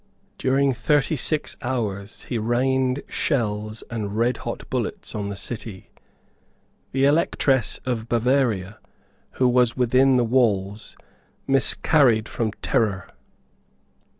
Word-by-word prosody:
During 135 Hz, +1 st, +2 dB
thirty 145 Hz, +6 st, +1 dB
six 155 Hz, +2 st, -1 dB
hours 110 Hz, -5 st, -4 dB
he 120 Hz, -, -3 dB
rained 130 Hz, +3 st, 0 dB
shells 110 Hz, -5 st, -2 dB
and 105 Hz, -2 st, -4 dB
redhot 120 Hz, +2 st, -2 dB
bullets -, -, -3 dB
on 100 Hz, -1 st, -3 dB
the 100 Hz, -, -5 dB
city. 105 Hz, -1 st, -8 dB, 1.0 s
The 135 Hz, +1 st, +2 dB
Electress 140 Hz, -4 st, +2 dB
of 115 Hz, -3 st, -3 dB
Bavaria, 120 Hz, -5 st, +1 dB, 0.5 s
who 130 Hz, -, +2 dB
was 125 Hz, -1 st, +3 dB
within 130 Hz, +2 st, +4 dB
the 120 Hz, -, +3 dB
walls, 110 Hz, -4 st, 0 dB, 0.5 s
miscarried 135 Hz, -3 st, +3 dB
from 115 Hz, -3 st, -2 dB
terror. 100 Hz, -6 st, 0 dB
120 Hz, 105 wpm, -23 LUFS, 110-130 Hz, 1.0 s, within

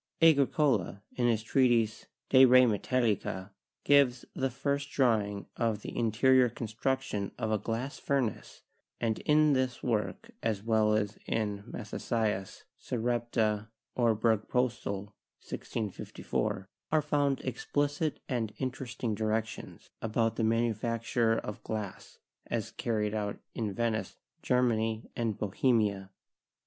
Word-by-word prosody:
Agricola, 140 Hz, -, +3 dB
in 120 Hz, -1 st, +2 dB
his 110 Hz, -2 st, +1 dB
treatise, 115 Hz, -3 st, +2 dB, 0.2 s
'De 130 Hz, -1 st, +7 dB
re 130 Hz, 0 st, +8 dB
Metallica/ 105 Hz, -4 st, 0 dB, 0.3 s
gives 135 Hz, -4 st, +4 dB
the 135 Hz, -, 0 dB
first 140 Hz, +2 st, -2 dB
drawing 105 Hz, -7 st, +1 dB
of 110 Hz, -3 st, 0 dB
the -, -, -6 dB
interior 125 Hz, +3 st, +4 dB
construction 115 Hz, -2 st, -2 dB
of 110 Hz, -, -2 dB
a 110 Hz, -, +2 dB
glass 120 Hz, +7 st, -3 dB
furnace, 135 Hz, -5 st, -2 dB, 0.4 s
and 110 Hz, -2 st, 0 dB
in 150 Hz, 0 st, +4 dB
this 130 Hz, -2 st, 0 dB
work 105 Hz, -6 st, -2 dB
as 110 Hz, -3 st, -1 dB
well 110 Hz, -1 st, +3 dB
as 105 Hz, -1 st, -1 dB
in 105 Hz, -3 st, -1 dB
Mathesius' 105 Hz, -3 st, -3 dB, 0.2 s
'Sarepta 115 Hz, -3 st, -1 dB, 0.2 s
or 115 Hz, -3 st, +3 dB
Bergpostill' 110 Hz, -2 st, 0 dB, 0.3 s
(1654), 100 Hz, -2 st, -3 dB, 0.2 s
are 155 Hz, 0 st, +4 dB
found 145 Hz, -2 st, +1 dB
explicit 145 Hz, +3 st, -1 dB
and 115 Hz, -5 st, -2 dB
interesting 125 Hz, -3 st, -3 dB
directions 110 Hz, +1 st, -3 dB
about 115 Hz, 0 st, 0 dB
the 115 Hz, -, -1 dB
manufacture 115 Hz, 0 st, +1 dB
of 105 Hz, -, -5 dB
glass 105 Hz, -3 st, -5 dB, 0.3 s
as -, -, -2 dB
carried 105 Hz, -2 st, -1 dB
out 105 Hz, -1 st, -2 dB, 0.2 s
in 110 Hz, -3 st, -2 dB
Venice, 115 Hz, +1 st, -2 dB, 0.2 s
Germany 115 Hz, -3 st, +1 dB
and 115 Hz, -3 st, -1 dB
Bohemia. 105 Hz, -2 st, +1 dB
115 Hz, 115 wpm, -30 LUFS, 105-125 Hz, 0.4 s, re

